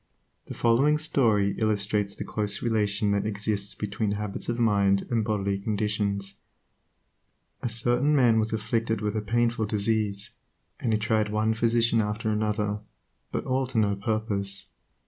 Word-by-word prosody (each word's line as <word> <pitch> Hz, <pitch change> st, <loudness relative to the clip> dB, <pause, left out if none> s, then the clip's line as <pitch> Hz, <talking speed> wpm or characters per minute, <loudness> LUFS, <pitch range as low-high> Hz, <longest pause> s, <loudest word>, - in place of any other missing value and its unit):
The -, -, -7 dB
following 135 Hz, +6 st, +3 dB
story 110 Hz, -10 st, +2 dB
illustrates 105 Hz, -2 st, 0 dB
the -, -, -5 dB
close 105 Hz, -1 st, -2 dB
relation 105 Hz, -3 st, +1 dB
that 100 Hz, +1 st, 0 dB
exists 100 Hz, -1 st, -3 dB
between 100 Hz, 0 st, -2 dB
habits 105 Hz, +1 st, -4 dB
of 120 Hz, -, -1 dB
mind 100 Hz, -4 st, +3 dB
and 115 Hz, -2 st, +2 dB
bodily 100 Hz, -2 st, -1 dB
conditions. 100 Hz, -1 st, -2 dB, 1.2 s
A 120 Hz, -, -2 dB
certain 120 Hz, +6 st, +2 dB
man 120 Hz, -5 st, +4 dB
was 110 Hz, 0 st, 0 dB
afflicted 110 Hz, 0 st, -1 dB
with 105 Hz, 0 st, -1 dB
a 110 Hz, -, 0 dB
painful 115 Hz, 0 st, 0 dB
disease, 105 Hz, -1 st, 0 dB, 0.5 s
and 115 Hz, -, -1 dB
he 110 Hz, -, +3 dB
tried 110 Hz, -1 st, +1 dB
one 110 Hz, +1 st, +1 dB
physician 115 Hz, 0 st, +2 dB
after 105 Hz, +1 st, -2 dB
another, 105 Hz, -1 st, -1 dB, 0.5 s
but -, -, -3 dB
all 130 Hz, 0 st, 0 dB
to 130 Hz, -1 st, -5 dB
no 105 Hz, -2 st, +3 dB
purpose. 100 Hz, -1 st, -2 dB
110 Hz, 145 wpm, -27 LUFS, 100-115 Hz, 1.2 s, man